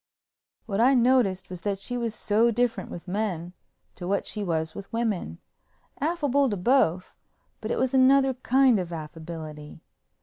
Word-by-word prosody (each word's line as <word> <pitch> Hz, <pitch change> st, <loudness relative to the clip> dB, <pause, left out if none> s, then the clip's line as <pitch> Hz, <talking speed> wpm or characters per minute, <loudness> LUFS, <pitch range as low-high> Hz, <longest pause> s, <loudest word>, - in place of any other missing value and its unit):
What 205 Hz, -1 st, -1 dB
I 260 Hz, +3 st, +5 dB
noticed 235 Hz, -7 st, +2 dB
was 180 Hz, -2 st, -7 dB
that 200 Hz, 0 st, -1 dB
she 245 Hz, +5 st, -5 dB
was 230 Hz, -2 st, -2 dB
so 215 Hz, +2 st, +2 dB
different 235 Hz, -4 st, -1 dB
with 175 Hz, -, -9 dB
men 180 Hz, -3 st, -3 dB, 0.4 s
to 175 Hz, -, -7 dB
what 200 Hz, +1 st, 0 dB
she 210 Hz, -, -2 dB
was 160 Hz, -3 st, -2 dB
with 200 Hz, -, -9 dB
women—affable 265 Hz, -, -2 dB
to 205 Hz, -, -2 dB
both, 185 Hz, -4 st, +2 dB, 0.5 s
but 215 Hz, -, -5 dB
it -, -, -1 dB
was 260 Hz, 0 st, 0 dB
another 265 Hz, +1 st, +5 dB
kind 255 Hz, -2 st, +3 dB
of 175 Hz, -2 st, -4 dB
affability. 155 Hz, -2 st, -8 dB
210 Hz, 155 wpm, -26 LUFS, 175-250 Hz, 0.5 s, I